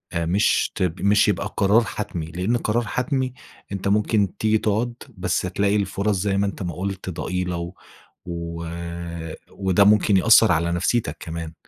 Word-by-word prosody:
مش 85 +5 +2
ت - - -1 0.2
مش 100 +1 +4
يبقى 100 -4 -1
قرار 105 +4 +4
حتمي 90 -7 -4
لأن 90 +9 -1
قرار 115 +1 0
حتمي 130 0 -1 0.4
أنت 100 0 -3
ممكن 105 -1 +1
تيجي 110 0 +2
تقعد 110 +3 0 0.2
بس 90 - 0
تلاقي 100 +3 0
الفُرَص 100 +1 0
زي 95 +1 0
ما 100 - +2
أنت 100 - -4
ما 90 -1 -3
قلت 95 0 -4
ضئيلة 90 +1 -3
و 85 +2 -5 0.5
و 85 -1 -5 0.9
وده 95 0 +2
ممكن 105 -1 +4
يأثّر 110 +2 +6
على 85 +1 +1
نفسيتك 85 -2 0
كمان، 80 -1 -6
100 Hz, 155 wpm, -23 LUFS, 85-105 Hz, 0.9 s, يأثّر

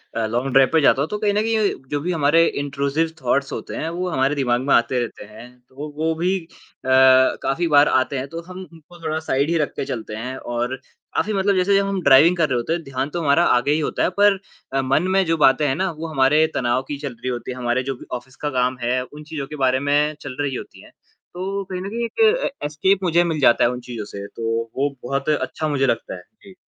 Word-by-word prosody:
अ, 115 - 0
long 120 +4 -2
drive 135 -1 +5
पे 160 - +4
जाता 140 0 +4
हूँ 155 - -1
तो 210 - -3
कहीं 205 -1 0
न 210 - +2
कहीं 220 -2 +1 0.2
जो 145 - -1
भी 180 +3 -2
हमारे 165 +1 +3
इंट्रूसिव 145 +3 -1
थॉट्स 140 +2 0
होते - - -6
हैं 160 - -3
वो 180 +2 -3
हमारे 135 -1 +1
दिमाग 125 -3 +1
में 140 - +1
आते 120 +2 +2
रहते 120 -3 -5
हैं। 110 +3 -12 0.2
तो 145 +3 -8
वो 160 +1 0
भी 180 +4 0
अ, 165 - -15 1.0
काफ़ी 165 +5 0
बार 145 -1 +5
आते 130 +1 +1
हैं 130 +2 -4
तो 165 +3 -7
हम 185 0 -8
उनको 165 +2 -16
थोड़ा 155 0 -1
साइड 140 +4 +1
ही 170 - +1
रख 150 - 0
के - - -3
चलते 110 -3 -5
हैं 125 +4 -5
और 120 +2 -3 0.4
काफ़ी 215 - 0
मतलब 195 0 +1
जैसे 195 +2 +3
जब 200 - +2
हम 195 -2 -2
ड्राइविंग 145 +6 +6
कर 160 -2 +2
रहे 125 - +1
होते 120 +7 -1
हैं 170 -1 -3
ध्यान 135 0 -3
तो 170 +2 -4
हमारा 150 +3 +3
आगे 130 +4 0
ही 155 - +2
होता 150 - -1
है - - +2
पर 205 -2 +5 0.3
अ, 135 - +2
मन 135 +7 +1
में 195 - +3
जो 165 -1 +1
बातें 140 +3 +2
हैं 135 - 0
ना 185 +1 -1
वो 160 +1 -7
हमारे 150 +1 +3
तनाव 120 +1 +1
की 145 - -3
चल 140 -3 -6
रही 130 - -6
होती 125 +1 -4
हैं, 125 - -7
हमारे 120 +1 0
जो 135 0 -3
भी - - -13
ऑफ़िस 130 +2 -16
का 150 - -3
काम 125 -1 0
है, 125 +2 0
उन 150 +4 -12
चीज़ों 150 -3 -6
के 150 - -8
बारे 130 0 +2
में 150 +1 +2
चल 135 -3 -7
रही 135 -3 -2
होती - - -9
हैं, - - -16 0.4
तो 195 +2 -3
कहीं 185 -1 -5
न 195 - -5
कहीं 235 +2 -2
एक 230 - -9 0.3
ए - - 0 0.2
एस्केप 190 +6 +1
मुझे 175 -1 +3
मिल 160 -3 -2
जाता 120 - +4
है 120 - +4
उन 125 - -5
चीज़ों 110 -4 -5
से 100 -1 -8
तो 115 - -6 0.3
वो 140 +1 +1
बहुत 135 +3 -2
अच्छा 150 +1 -1
मुझे 140 -2 +1
लगता 115 - -2
है। 90 - -10 0.2
जी। 195 - -14
145 Hz, 255 wpm, -21 LUFS, 130-170 Hz, 1.0 s, ड्राइविंग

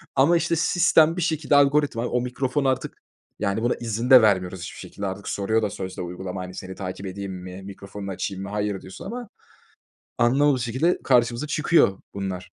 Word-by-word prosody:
Ama, 155 +6 +5
işte, 170 0 0
sistem 165 0 +4
bir - - -1
şekilde 155 -3 +1
algoritma, 140 -4 +3
o 125 - 0
mikrofon 130 +2 -1
artık 130 -1 -1 0.4
yani, 100 +1 -1
buna 120 - +2
izin 115 +2 -3
de 130 -3 +10
vermiyoruz 95 -4 +1
hiçbir 85 - -7
şekilde 100 - -7
artık. 95 +1 -6
Soruyor 110 +3 0
da 105 - 0
sözde 95 -2 -6
uygulama, 90 +1 -5
hani, 90 0 -8
"Seni 95 0 -7
takip 95 0 -6
edeyim 95 0 -5
mi, 90 +1 -8
mikrofonunu 100 0 -8
açayım 95 +1 -4
mı?" 100 - -6
"Hayır." 105 -2 -2
diyorsun 95 - -10
ama 240 -2 -6 0.9
anlamadığımız 130 +2 +3
şekilde 130 +9 +1
karşımıza 125 +2 +2
çıkıyor 150 - +3 0.2
bunlar. 95 -2 -4
110 Hz, 175 wpm, -24 LUFS, 95-140 Hz, 0.9 s, de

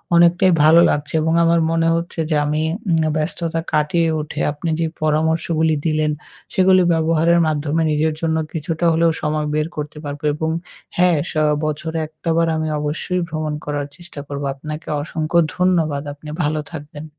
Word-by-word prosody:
অনেকটাই 175 +2 +5
ভালো 160 +2 +7
লাগছে। 145 0 -2
এবং 160 +1 +1
আমার 170 0 +3
মনে 165 0 +2
হচ্ছে 170 0 -4
যে 155 - +1
আমি 150 +1 0 0.3
উম 165 -1 +3
ব্যস্ততা 165 +1 -2
কাটিয়ে 160 +2 +2
উঠে 150 - -7
আপনি 150 +3 -4
যে 165 - +1 0.2
পরামর্শগুলি 160 +1 +1
দিলেন, 155 -1 +1 0.4
সেগুলি 185 0 +5
ব্যবহারের 165 +1 +3
মাধ্যমে 155 +1 0
নিজের 155 +1 +1
জন্য 160 -1 +1 0.2
কিছুটা 165 +2 -2
হলেও 165 0 +3
সময় 150 0 -1
বের 155 0 0
করতে 150 0 -5
পারবো। 145 +1 -6
এবং 160 +1 -2 0.5
হ্যাঁ 180 -2 +4
স - - -9 0.3
বছরে 160 +2 -3
১ 155 - -13
টা - - -1
বার 165 - +3
আমি 155 0 -1
অবশ্যই 155 +5 -2
ভ্রমণ 155 -1 -3
করার 145 -1 -3
চেষ্টা 175 -4 -11
করব। 140 0 -5
আপনাকে 150 +3 -8
অসংখ্য 160 +2 0 0.2
ধন্যবাদ, 165 -6 +1
আপনি 150 +1 -11
ভালো 150 +1 0
থাকবেন। 150 0 -8
160 Hz, 165 wpm, -20 LUFS, 150-165 Hz, 0.5 s, ভালো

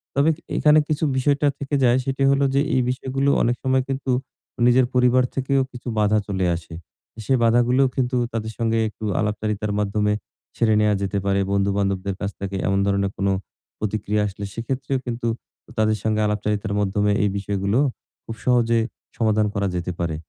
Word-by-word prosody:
তবে 140 +3 +4 0.3
এখানে 150 0 +5
কিছু 155 0 -1
বিষয়টা 145 +2 +2
থেকে 140 +1 -2
যায় 120 0 +5
সেটি 135 0 -1
হলো 140 0 +3
যে, 140 - +4
এই 130 - +3
বিষয়গুলো 135 +2 -1
অনেক 120 +1 +2
সময় 130 0 +2
কিন্তু 135 -1 -2 0.6
নিজের 125 +1 +5
পরিবার 125 0 +4
থেকেও 135 0 +1
কিছু 125 0 -10
বাঁধা 105 0 +3
চলে 95 -2 -1
আসে। 85 0 -9 0.5
সে 135 - +2
বাঁধাগুলোও 120 +3 +4
কিন্তু 125 -1 0 0.2
তাদের 110 -1 -3
সঙ্গে 115 -1 +1
একটু 110 - -13 0.2
আলাপচারিতার 105 0 -1
মাধ্যমে 105 0 +1 0.4
ছেড়ে 110 -2 +2
নেয়া 105 0 +3
যেতে 100 0 -1
পারে। 100 0 +2
বন্ধু-বান্ধবদের 100 -1 0
কাছ 100 0 -2
থেকে 100 0 -4
এমন 95 +1 +2
ধরনের 100 0 +1
কোনো 100 0 +1 0.5
প্রতিক্রিয়া 105 0 -1
আসলে 100 +1 -6
সেক্ষেত্রেও 130 +3 -2
কিন্তু 120 -1 -3 0.5
তাদের 110 0 +2
সঙ্গে 110 -1 +1
আলাপচারিতার 105 0 -1
মাধ্যমে 105 +1 +1
এই 105 - +2
বিষয়গুলো 100 +3 0 0.5
খুব 115 - -6
সহজে 115 -2 +3 0.4
সমাধান 110 -2 +2
করা 100 -1 0
যেতে 90 0 -2
পারে। 85 -2 -1
110 Hz, 165 wpm, -22 LUFS, 100-130 Hz, 0.6 s, এখানে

